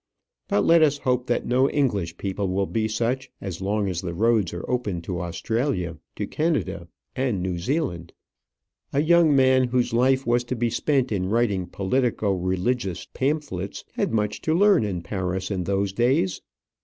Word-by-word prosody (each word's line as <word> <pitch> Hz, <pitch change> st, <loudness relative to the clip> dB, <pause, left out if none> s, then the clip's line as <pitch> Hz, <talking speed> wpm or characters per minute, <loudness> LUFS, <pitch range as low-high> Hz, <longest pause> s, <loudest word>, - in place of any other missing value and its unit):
But 105 Hz, -, +1 dB
let 165 Hz, 0 st, +6 dB
us 145 Hz, -2 st, +4 dB
hope 125 Hz, -2 st, 0 dB
that 120 Hz, -, 0 dB
no 130 Hz, +3 st, +3 dB
English 100 Hz, -, 0 dB
people 100 Hz, 0 st, -2 dB
will 95 Hz, +1 st, 0 dB
be 110 Hz, +2 st, -1 dB
such 120 Hz, +4 st, -1 dB
as 95 Hz, -2 st, -6 dB
long 100 Hz, +1 st, 0 dB
as 90 Hz, -3 st, -2 dB
the 85 Hz, -2 st, -5 dB
roads 110 Hz, -3 st, +2 dB
are 85 Hz, -, -6 dB
open 115 Hz, -8 st, -1 dB
to 90 Hz, -1 st, -3 dB
Australia, 90 Hz, -, -2 dB, 0.2 s
to -, -, -3 dB
Canada, 160 Hz, -1 st, -1 dB, 0.3 s
and 125 Hz, -7 st, 0 dB
New 90 Hz, -2 st, -2 dB
Zealand. 90 Hz, -, -2 dB, 0.8 s
A 140 Hz, -, +3 dB
young 165 Hz, -2 st, +5 dB
man 130 Hz, -1 st, +5 dB
whose 125 Hz, -1 st, 0 dB
life 130 Hz, +3 st, +3 dB
was 120 Hz, +1 st, +2 dB
to 125 Hz, -, -3 dB
be 120 Hz, -1 st, 0 dB
spent 130 Hz, +1 st, +1 dB
in 95 Hz, -3 st, 0 dB
writing 105 Hz, -5 st, +1 dB
politico 105 Hz, +2 st, 0 dB
religious 95 Hz, +2 st, -1 dB
pamphlets 135 Hz, -, -2 dB
had -, -, -1 dB
much 105 Hz, -2 st, -1 dB
to 160 Hz, -, +1 dB
learn 200 Hz, -, +5 dB
in 95 Hz, -5 st, -3 dB
Paris 95 Hz, +2 st, -3 dB
in 90 Hz, -3 st, -2 dB
those 100 Hz, +1 st, 0 dB
days. 120 Hz, -4 st, +1 dB
110 Hz, 170 wpm, -24 LUFS, 95-130 Hz, 0.8 s, let